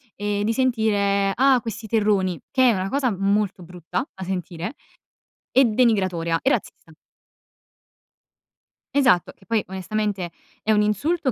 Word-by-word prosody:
ehm, 205 0 -2
di 225 - +1
sentire: 205 -5 +1
"Ah, 265 0 +4
questi 220 0 -6
terroni". 200 -6 +1
Che 260 -2 +4
è 230 - +4
una 190 0 -2
cosa 270 -4 +1
molto 195 0 0
brutta 180 - -5
da 190 - -7
sentire, 180 - -4 0.8
e 265 0 +6
denigratoria 190 -8 +1
e 265 - +2
razzista. - - -3 2.0
Esatto. 215 -11 +3
Che 190 - -24
poi 225 -2 0
onestamente 190 -1 -3 0.3
è 220 - 0
un 210 - +3
insulto 265 - 0
210 Hz, 135 wpm, -23 LUFS, 190-235 Hz, 2.0 s, e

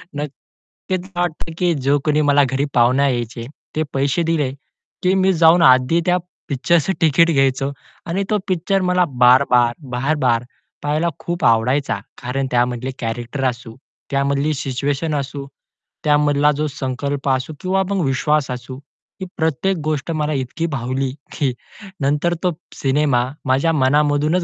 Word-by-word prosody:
नक्कीच 150 +5 -6
मला 175 -2 -4
वाटत 165 -1 -3
की 175 -2 +2
जो 140 0 +1
कोणी 150 0 +2
मला 145 -1 +4
घरी 135 +1 0
पाहुण्या 125 +4 +4
यायचे, 120 -2 -3 0.3
ते 155 - +1
पैसे 140 +5 +1
दिले, 160 -5 0 0.5
की 185 - +3
मी 190 0 +3
जाऊन 165 +1 +5
आधी 130 +4 +5
त्या 180 0 +3 0.3
पिक्चरचं 160 +6 +1
तिकीट 165 +1 +4
घ्यायचो 135 -1 +1 0.3
आणि 185 +3 -1
तो 215 - +2
पिक्चर 190 +1 0
मला 180 0 +3
बार-बार, 125 -2 +4 0.2
बार-बार 125 -3 +1 0.4
पहायला 150 +3 0
खूप 170 -5 -3
आवडायचा. 115 +1 +2 0.2
कारण 130 +2 -2
त्यामधले 125 +1 0
कॅरेक्टर 120 +4 -4
असू, 120 -2 -9 0.4
त्यामधली 140 +2 +1
सिच्युएशन 140 +3 -2
असू, 140 0 -4 0.6
त्यामधली, 145 -1 +2
जो 155 +1 0
संकल्प 140 0 -3
असू 130 +3 -1
किंवा 190 +1 +1
मग 195 -3 0
विश्वास 140 +1 +1
असू. 125 +1 -7 0.4
ही - - -2
प्रत्येक 165 +4 0
गोष्ट 155 +1 -2
मला 155 -1 -1
इतकी 135 +4 -3
भावली 130 -2 -2 0.2
की 140 -5 -1 0.5
नंतर 145 +5 +1
तो 180 - +2 0.2
सिनेमा, 135 -2 +1 0.2
माझ्या 135 +5 +2
मनामधूनच 150 +4 +2
145 Hz, 140 wpm, -19 LUFS, 130-160 Hz, 0.6 s, जाऊन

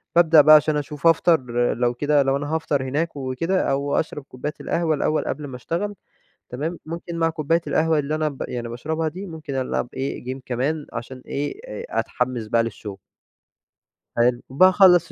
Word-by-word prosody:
بابدأ 165 -2 +7
بقى 155 +1 +8
عشان 150 0 +3
أشوف 150 +2 -2
أفطر 165 -1 +4 0.3
لو 120 0 0
كده، 145 +3 +2
لو 135 0 +1
أنا 145 +2 -3
هافطر 150 -4 0
هناك 150 +6 -2
وكده، 140 +7 -1
أو 140 +1 0
أشرب 150 -2 -4
كوباية 135 +3 -6
القهوة 165 -2 0
الأول 155 +2 0
قبل 150 -1 -4
ما 130 - -8
أشتغل 170 - -3 0.5
تمام، 155 +7 -4
ممكن 170 +1 -6
مع 165 0 +2
كوباية 160 +1 +1
القهوة 160 0 +2
اللي 150 +1 -1
أنا 155 0 0
ب 140 -3 -7
يعني 120 -1 -4
باشربها 155 +7 -2
دي 185 +6 -7
ممكن 155 -5 -7
ألعب 130 -2 -1
إيه، 135 -1 -4
جيم 130 +2 -5
كمان 140 +5 -1
عشان 125 +2 -7
إيه، 145 - -3
آآ 475 - -6 0.2
أتحمس 120 -4 -2
بقى 115 +2 +2
للشغل. 105 -3 -6 1.2
حلو. 120 +1 +3
باخلّص 180 +3 +5
150 Hz, 175 wpm, -23 LUFS, 130-165 Hz, 1.2 s, بقى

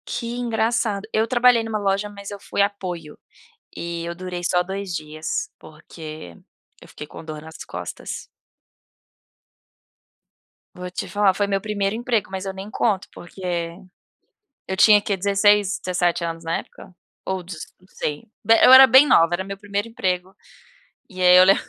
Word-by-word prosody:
Que 235 0 -4
engraçado, 225 -3 -1
eu 220 +1 +2
trabalhei 245 -2 +4
numa 220 -1 -2
loja, 200 0 -1
mas 200 -1 -9
eu 205 - -7
fui 200 - -2
apoio, 180 -6 -3 0.6
e 170 0 -5
eu 170 - -4
durei 180 0 -6
só 180 0 +2
2 190 0 -5
dias, 155 -1 -4
porque 155 - -11 0.4
eu - - -14
fiquei 150 - -10
com 160 - -11
dor 155 -1 -7
nas 160 +1 -12
costas. - - -7 2.5
Vou 180 0 -7
te 185 +1 -5
falar, 200 +1 +2
foi 205 +1 -1
meu 195 -1 0
primeiro 200 0 -2
emprego, 235 -2 -1
mas 190 0 -5
eu 195 - -4
nem 195 +2 -8
conto, 205 -4 0
porque 175 -2 -5 0.9
eu 190 - -2
tinha 210 +2 +7
que 205 -1 -1
16, 200 +1 +2
17 175 -1 0
anos 165 0 -4
na 165 0 -1
época, 180 - -12 0.3
ou 190 -1 -3
dezo 170 -3 -8
não 185 - -24
sei. 150 -1 -4 0.2
Bé 225 0 +5
eu 255 - +8
era 265 0 +11
bem 260 +4 +7
nova, 165 - +5
era 190 - -4
meu 195 0 -7
primeiro 205 +1 -3
emprego, 190 -5 -3 0.7
e 185 -4 -6
aí, 180 0 +7
eu 185 - +8
le 195 +1 +6
195 Hz, 165 wpm, -22 LUFS, 175-210 Hz, 2.5 s, era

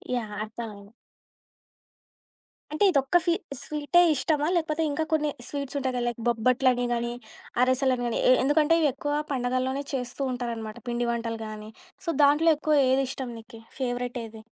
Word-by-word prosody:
Yeah! 215 -4 -3
అర్థమైంది. 215 -2 -8 1.8
అంటే, 310 +6 0
ఇదొక్క 275 0 +1
fee 340 - +3 0.3
స్వీటే 300 +3 +2
ఇష్టమా? 300 +1 0
లేపోతే 320 -1 0
ఇంకా 315 +3 -1
కొన్ని 300 -1 +2 0.2
స్వీట్సుంటాయి 280 -1 -3
కదా! 245 - -1
లైక్ 240 -1 -3
బొబ్బట్లని 245 +2 +2
గానీ, 235 0 -2 0.5
అరసెలని 255 -1 +2
గాని, 235 - -1
ఎ - - +8
ఎందుకంటే 305 +3 +4
ఇవి 295 - +4
ఎక్కువ 290 0 -3 0.2
పండగల్లోనే 255 +2 -1
చేస్తూ 250 +1 -3
ఉంటారనమాట. 230 -2 -5
పిండి 240 0 -1
వంటలు 230 -1 -3
గాని, 215 0 -8 0.4
సో, - - -2
దాంట్లో 295 +4 +5
ఎక్కువ 305 0 +1
ఏది 265 +1 +3
ఇష్టం 260 -2 -5
నీకి 225 0 -13 0.2
ఫేవరెట్ 245 -1 -2
ఏది? 220 0 -11
255 Hz, 145 wpm, -26 LUFS, 235-290 Hz, 1.8 s, ఎ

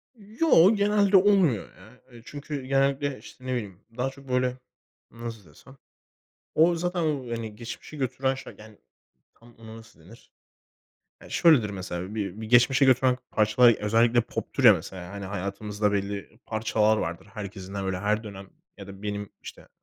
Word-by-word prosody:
Yo, 215 - +4
genelde 205 -1 +3
olmuyor, 185 - +3
ya. 120 +3 -18
Eee, 120 -1 -14
çünkü, 145 -2 -6
genellikle, 135 +1 +1
işte 130 - -15
ne 130 - -2
bileyim, 105 -6 -5 0.2
daha 130 +2 0
çok 135 0 -15
böyle, 125 0 0 0.5
nasıl 115 -6 -9
desem? 135 - -18 0.8
O 170 +2 +4
zaten 175 +1 -2
o 150 -3 0
hani 115 -2 -5
geçmişe 120 +6 -9
götüren 130 0 -1
şey, 130 - -10
yani 110 -1 -14 0.6
tam 115 0 -19
ona 110 0 -11
nasıl 110 -5 -16
denir? 95 +9 -17 0.9
Ya - - -14
şöyledir 135 -11 +4
mesela 95 0 -6
bir 105 -1 -4
bir 110 - -6
geçmişe 125 +4 +5
götüren 130 -1 +3
parçalar 110 +3 +5
özellikle 115 +3 +2
poptur 115 +3 -4
ya 115 - +10
mesela, 90 0 -8
hani 100 -1 -7
hayatımızda 100 +2 -2
belli 100 +2 -4
parçalar 110 -1 +1
vardır. 85 -1 -4
Herkesin 100 -2 -8
de 100 - -3
böyle 95 -1 -2
her 105 +3 -1
dönem 100 -2 -10 0.3
ya 100 - -9
da 100 0 -12
benim 105 -1 -4
işte - - -11
115 Hz, 160 wpm, -26 LUFS, 100-135 Hz, 0.9 s, ya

